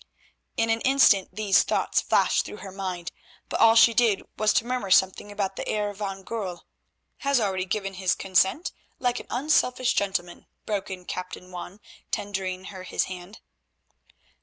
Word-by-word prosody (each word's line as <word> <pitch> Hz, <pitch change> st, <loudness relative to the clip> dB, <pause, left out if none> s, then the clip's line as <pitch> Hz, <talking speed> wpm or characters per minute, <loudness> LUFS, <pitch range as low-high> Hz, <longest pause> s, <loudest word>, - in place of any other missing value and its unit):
In 225 Hz, 0 st, +2 dB
an 225 Hz, 0 st, 0 dB
instant 260 Hz, -8 st, +4 dB
these 205 Hz, -2 st, +3 dB
thoughts -, -, +1 dB
flashed -, -, +2 dB
through -, -, -8 dB
her 190 Hz, -, -7 dB
mind, 185 Hz, -3 st, -5 dB, 0.4 s
but -, -, -2 dB
all 225 Hz, 0 st, +7 dB
she 230 Hz, 0 st, +7 dB
did 225 Hz, -4 st, +3 dB
was 215 Hz, 0 st, +2 dB
to -, -, +2 dB
murmur 250 Hz, -5 st, -2 dB
something 190 Hz, +2 st, +3 dB
about 195 Hz, -2 st, -3 dB
the -, -, -3 dB
Heer 210 Hz, -1 st, -1 dB
van 195 Hz, -1 st, -5 dB
Goorl—— 190 Hz, -6 st, -5 dB, 0.6 s
"Has 280 Hz, -2 st, +2 dB
already 190 Hz, -4 st, -1 dB
given 195 Hz, +1 st, -3 dB
his 185 Hz, -1 st, 0 dB
consent, 190 Hz, -, +1 dB, 0.3 s
like 245 Hz, -1 st, 0 dB
an -, -, -11 dB
unselfish 255 Hz, -1 st, +2 dB
gentleman," 180 Hz, -3 st, -2 dB, 0.2 s
broke 205 Hz, -2 st, -2 dB
in 185 Hz, -1 st, -7 dB
Captain 180 Hz, 0 st, -6 dB
Juan 180 Hz, +2 st, -8 dB, 0.3 s
tendering 190 Hz, -2 st, -3 dB
her 190 Hz, -, -8 dB
his 185 Hz, -, -1 dB
hand. 185 Hz, +3 st, -9 dB
195 Hz, 160 wpm, -26 LUFS, 185-225 Hz, 0.6 s, all